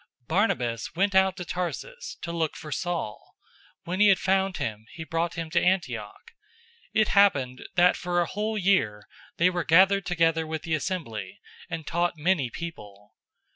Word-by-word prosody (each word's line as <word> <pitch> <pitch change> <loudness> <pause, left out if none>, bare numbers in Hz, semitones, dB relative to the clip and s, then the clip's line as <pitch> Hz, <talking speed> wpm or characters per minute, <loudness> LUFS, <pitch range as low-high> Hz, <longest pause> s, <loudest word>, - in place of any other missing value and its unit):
011:025 - - -40
Barnabas 125 - 0
went 200 +3 +1
out 190 0 +4
to 180 - -5
Tarsus 330 - -5
to 170 - -3
look 165 -2 -1
for 150 - -9
Saul. 165 - -4 0.5
011:026 - - -26
When 180 +2 -2
he 210 - +6
had 195 -2 +6
found 190 0 +1
him, 110 0 -4
he 160 - -7
brought 165 +2 -2
him 165 -1 -5
to 175 - +3
Antioch. 390 - -1 0.6
It 215 -1 +2
happened, 135 -11 +3
that 180 0 +5
for 175 0 -1
a 175 - +2
whole 215 +4 -3
year 175 - +1 0.3
they 180 +2 +4
were 175 -1 -1
gathered 195 +3 +4
together 165 -2 +1
with 160 -1 -4
the 165 - -2
assembly, 135 - -3 0.3
and 160 -1 -5
taught 175 +1 0
many 155 -5 +1
people. 105 -10 -9
175 Hz, 175 wpm, -26 LUFS, 155-190 Hz, 0.6 s, he